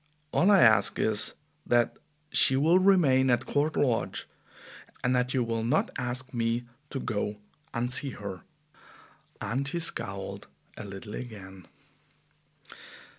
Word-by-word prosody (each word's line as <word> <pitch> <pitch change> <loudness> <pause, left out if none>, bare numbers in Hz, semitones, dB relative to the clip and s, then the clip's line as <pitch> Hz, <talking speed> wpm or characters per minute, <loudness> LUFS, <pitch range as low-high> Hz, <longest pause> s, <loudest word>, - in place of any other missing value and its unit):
All 185 - +3
I 200 -3 +6
ask 110 -4 +5
is 105 -1 +1 0.3
that 120 -1 +2 0.3
she 130 - +4
will 160 +7 +4
remain 155 -9 +4
at 120 -1 +2
Court 150 +2 0
Lodge 125 -5 0 0.8
and 125 +1 +2
that 125 0 +1
you 125 - +2
will 115 -1 -2
not 125 +7 +1
ask 125 0 -3
me 115 0 0 0.3
to 135 - -4
go 105 -3 -2 0.3
and 120 +1 0
see 140 - +1
her," 100 -7 -7 1.0
and 135 +4 -1
he 170 +5 -1
scowled 100 - -5 0.3
a 110 - -8
little 100 +1 -8
again. 95 -7 -9
120 Hz, 130 wpm, -28 LUFS, 110-135 Hz, 1.0 s, I